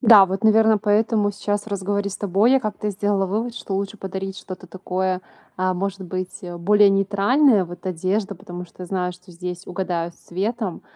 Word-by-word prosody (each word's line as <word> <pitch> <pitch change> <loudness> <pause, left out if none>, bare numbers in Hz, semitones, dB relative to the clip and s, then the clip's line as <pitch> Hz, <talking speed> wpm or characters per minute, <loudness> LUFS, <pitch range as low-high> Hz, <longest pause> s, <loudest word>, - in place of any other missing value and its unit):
Да, 215 -5 +8
вот, 190 +4 -3
наверное, 220 0 +5
поэтому 210 0 +2
сейчас, 205 +1 -2
в - - -23
разговоре 200 0 -1
с 195 - -5
тобой, 205 +5 +3
я 270 - +5
как-то 210 -1 -3
сделала 200 -1 0
вывод, 225 +5 -2
что 195 - -4
лучше 200 +2 -2
подарить 190 0 -5
что-то 185 -1 -9
такое, 185 0 -2 0.4
а, 185 0 +1
может 195 +1 -3
быть, 185 0 -5 0.2
более 205 +3 +6
нейтральное. 200 +4 +4
Вот 175 +1 -10
одежда, 190 +3 -1
потому 180 -1 -8
что 180 +1 -10
знаю, 180 -1 -1
что 180 0 -16
здесь 180 +1 -6
угадают 175 -2 -2
с - - -27
цветом, 205 +1 -3
195 Hz, 180 wpm, -22 LUFS, 185-210 Hz, 0.4 s, Да